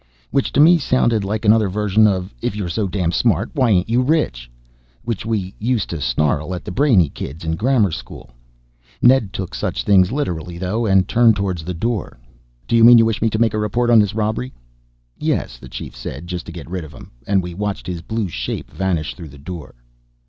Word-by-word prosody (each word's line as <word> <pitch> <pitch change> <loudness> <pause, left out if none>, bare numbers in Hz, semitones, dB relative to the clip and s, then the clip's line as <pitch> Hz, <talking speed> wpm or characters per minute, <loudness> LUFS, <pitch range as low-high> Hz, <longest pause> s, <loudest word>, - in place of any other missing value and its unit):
Which 135 - 0
to - - +1
me 165 +3 +7
sounded 120 -6 +1
like 105 +3 -3
another 105 -1 +4
version 105 +2 +3
of 95 -5 -2
"if - - -2
you're 100 -4 -3
so 100 +4 -1
damned 90 -2 -1
smart 110 0 +1
why 130 -6 +2
ain't 90 -3 +2
you 120 +3 +2
rich?" 125 - 0 0.6
which 115 -2 -3
we 100 -4 -2
used 115 -1 -1
to 85 -3 -4
snarl 75 +5 0
at 90 - -8
the - - -5
brainy 115 - +3
kids 70 +3 -8
in 80 0 -1
grammar 110 -1 +2
school. - - -9 0.7
Ned 120 -5 +4
took 95 -2 -5
such - - -3
things 95 -1 +4
literally 90 - -3
though, 105 +6 -1
and 95 -1 +3
turned 120 -1 +4
towards 95 -4 -2
the 90 +2 -5
door. 110 - -3 0.5
"Do 115 - +1
you 115 - +5
mean 120 +1 +9
you 115 - +5
wish 115 -2 -1
me 115 - +2
to 110 - -2
make 115 -1 +2
a 110 - -1
report 120 +3 0
on 115 - +7
this 105 0 +1
robbery?" 110 +4 -2 0.7
"Yes," - - -2
the 65 - -12
Chief - - -8
said 65 +6 -7
just 90 0 -6
to - - -6
get 85 -4 -9
rid 90 0 -4
of 80 0 -11
him, - - -13 0.2
and 95 -2 +2
we 90 0 -6
watched 100 +2 -4
his 90 -3 -5
blue 110 +3 -3
shape 65 -7 -5
vanish 90 -5 -2
through 85 -5 -10
the 70 - -14
door. 80 +1 -9
100 Hz, 215 wpm, -19 LUFS, 85-115 Hz, 0.7 s, mean